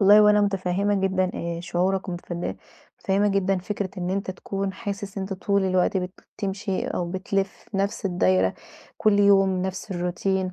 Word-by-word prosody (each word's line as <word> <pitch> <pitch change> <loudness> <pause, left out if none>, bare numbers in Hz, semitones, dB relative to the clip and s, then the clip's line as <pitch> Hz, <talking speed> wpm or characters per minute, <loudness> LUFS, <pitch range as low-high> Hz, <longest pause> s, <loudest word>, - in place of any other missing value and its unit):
والله 205 +2 +8
وأنا 210 0 +6
مُتفهِّمة 200 0 +1
جدًا 190 -1 +1
آآ 170 0 -3
شعورك 185 +2 0
ومتفن 175 -1 -4 0.4
مُتفهِّمة 200 +2 +2
جدًا 195 -1 +1
فكرة 195 +1 -3
إن 180 0 -2
أنت 195 0 -1
تكون 195 +1 -3
حاسس 200 -1 -5
إن - - -2
أنت 190 +1 -4
طول 200 +1 +1
الوقت 185 +1 +2
بتمشي، 190 +1 -3
أو 175 -1 -2
بتلف 195 +1 0 0.2
في 195 - -4
نفس 200 +1 -1
الدايرة 95 - +2 0.4
كل 210 -1 +4
يوم 195 -2 +4
نفس 190 +2 -4
الروتين. 185 +1 -1
190 Hz, 160 wpm, -25 LUFS, 185-200 Hz, 0.4 s, والله